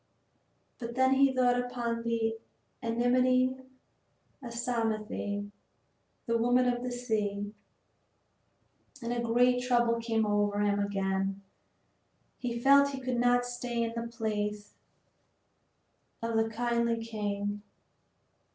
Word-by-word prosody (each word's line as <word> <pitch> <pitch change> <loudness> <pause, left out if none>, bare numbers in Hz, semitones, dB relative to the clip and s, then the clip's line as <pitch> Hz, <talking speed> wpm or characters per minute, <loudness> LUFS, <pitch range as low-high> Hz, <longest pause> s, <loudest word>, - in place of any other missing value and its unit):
But 235 -1 -6
then 260 +1 +4
he 270 0 +5
thought 250 -1 +3
upon 240 -2 -2
the 230 -1 0 0.5
enmity 255 +2 +2 0.9
of 240 -3 -7
Psamathe, 220 -4 -2 0.7
the 230 0 +1
woman 245 +2 +3
of 245 0 0
the 250 0 -3
sea, 210 -4 -2 1.5
and 240 0 -1
great 245 +2 +3
trouble 240 -2 +2
came 225 -1 0
over 205 0 +1
him 205 0 +2
again. 195 -1 -1 1.0
He 235 -2 -3
felt 280 +2 +6
he 270 - -4
could 255 -2 -2
not 245 0 +3
stay 245 -1 -2
in 230 0 -2
the 230 0 -3
palace 210 -3 -3 1.5
of 230 0 -1
the 225 0 +2
kindly 235 0 0
king. 205 -2 -3
235 Hz, 110 wpm, -30 LUFS, 215-245 Hz, 1.5 s, felt